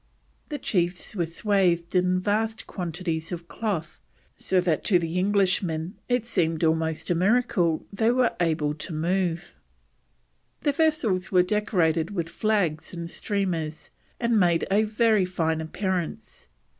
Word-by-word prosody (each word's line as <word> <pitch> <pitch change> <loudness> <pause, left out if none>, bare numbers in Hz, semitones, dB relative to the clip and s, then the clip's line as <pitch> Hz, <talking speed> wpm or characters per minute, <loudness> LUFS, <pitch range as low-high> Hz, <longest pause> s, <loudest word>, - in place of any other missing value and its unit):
The 295 - -3
chiefs 180 -5 -1
were 170 -4 0
swathed 175 -1 +1
in 180 0 +2
vast 220 +3 -1
quantities 165 -2 -4
of 170 -1 -6
cloth, 180 -8 -4 0.3
so 190 - +1
that 170 -4 0
to 185 - +5
the 170 +1 -1
Englishmen 185 -3 +1 0.2
it 245 -2 +1
seemed 165 -8 0
almost 160 +1 0
a - - +5
miracle 185 -3 +2
they 220 +3 +2
were 245 0 +2
able 155 -3 +1
to 155 +2 -5
move. 175 +2 -1 1.1
The 290 - +2
vessels 260 - +1
were 180 -2 +5
decorated 180 -5 +1
with 170 -2 -2
flags 180 -6 -1
and 170 0 -6
streamers, 175 -7 -3 0.3
and 235 -2 +2
made 175 -3 +3
a 210 +2 +4
very 215 -1 +3
fine 160 -3 -1
appearance. 180 +1 -4
180 Hz, 135 wpm, -26 LUFS, 165-210 Hz, 1.1 s, to